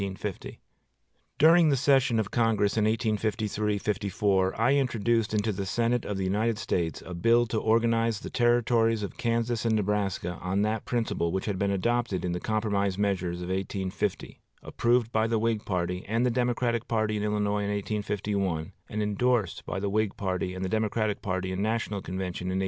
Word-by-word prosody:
During 165 +1 +6
the 140 - +3
session 135 -3 +3
of 105 -2 -2
Congress 110 -3 +2
of 110 -2 +2
1853 110 -1 0
54, 100 -1 0
I 120 +4 +4
introduced 120 -5 +1
into 110 0 +1
the 100 -1 -4
Senate 120 +3 0
of 105 - -3
the 95 - -2
United 105 +4 0
States 85 -6 -2
a 90 - -7
bill 115 +7 +3
to 110 -1 -1
organize 115 0 +2
the - - -8
Territories 115 -2 +2
of 100 - -6
Kansas 115 0 0
and 115 -1 +2
Nebraska 100 -4 -1
on 95 +3 0
that 110 +1 -1
principle 115 -8 -1
which 95 +1 -2
had 100 -3 -2
been 100 - +1
adopted 100 0 0
in 90 - -1
the 90 - -2
compromise 100 -2 0
measures 95 -4 -1
of 90 - -6
1850, 95 +1 -3 0.2
approved 120 -1 +1
by 110 -1 +2
the 115 0 +1
Whig 110 -1 0
party 90 -1 -2
and 115 +4 +1
the 125 - +2
Democratic 120 -1 0
party 110 -2 0
in - - -2
Illinois 105 -1 0
in - - -2
1851, 100 -4 -2 0.2
and 105 0 -2
indorsed 110 +1 0
by - - -2
the 100 - -2
Whig 105 0 0
party 95 -1 -2
and 95 +1 -3
the 110 +4 0
Democratic 110 -1 -1
party 95 -1 -2
in 95 +1 -2
national 110 -2 -1
convention 90 0 -4
in 95 0 -1
1852. - - +1
105 Hz, 180 wpm, -28 LUFS, 95-115 Hz, 0.2 s, During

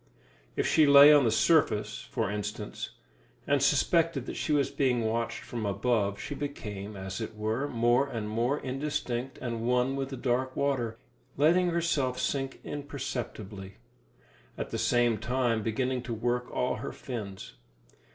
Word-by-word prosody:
If - - 0
she 155 -2 +4
lay 140 +1 +10
on 145 -3 +5
the - - +4
surface, 110 -6 +2
for - - -1
instance, 105 0 -4 0.6
and 140 -1 +2
suspected 150 0 +2
that - - -6
she - - -2
was 145 -2 +2
being 125 -4 +1
watched 115 +1 -1
from 120 -2 -5
above, 100 -1 0
she - - -5
became, 105 -8 -6
as 95 +3 -5
it 110 0 -5
were, 110 +6 -1
more 120 +2 +2
and 110 -5 -4
more 120 +6 0
indistinct 130 -2 -3
and 115 -2 -3
one 125 +3 +1
with 135 -1 -3
the 135 - -6
dark 130 +1 -1
water, 125 -5 0 0.4
letting 175 +5 +4
herself 150 -7 0
sink 135 +1 -2
imperceptibly, 115 -9 -6 0.8
at - - -5
the - - -2
same 120 -3 +2
time 120 0 0
beginning 125 +4 -1
to 120 -2 -4
work 120 +2 -1
all 125 - -1
her - - -5
fins. 100 - -7
125 Hz, 150 wpm, -29 LUFS, 110-140 Hz, 0.8 s, lay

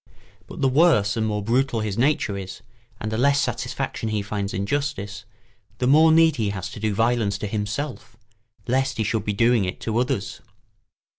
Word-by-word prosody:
But - - -9
the 135 - +4
worse 130 -8 +3
and 110 -1 0
more 105 -1 -2
brutal 120 +1 +1
his 105 -2 -2
nature 120 -4 +1
is, 95 +1 -7 0.4
and 110 - -4
the 110 - -1
less 140 +2 +3
satisfaction 110 - -3
he 105 -2 -1
finds 100 -1 -3
in 100 +2 -2
justice, 105 -7 -3 0.5
the 125 - -1
more 155 +5 +6
need 160 -1 +5
he 110 -3 0
has 95 -3 -5
to - - -8
do 105 -1 -1
violence 115 -2 +1
to 105 - -5
himself, 110 +3 -4 0.5
lest 130 +1 0
he 110 - +1
should 110 0 -1
be 105 - -1
doing 115 +1 +3
it 90 - -4
to 115 +1 -1
others. 125 -5 -2
110 Hz, 190 wpm, -23 LUFS, 105-130 Hz, 0.5 s, more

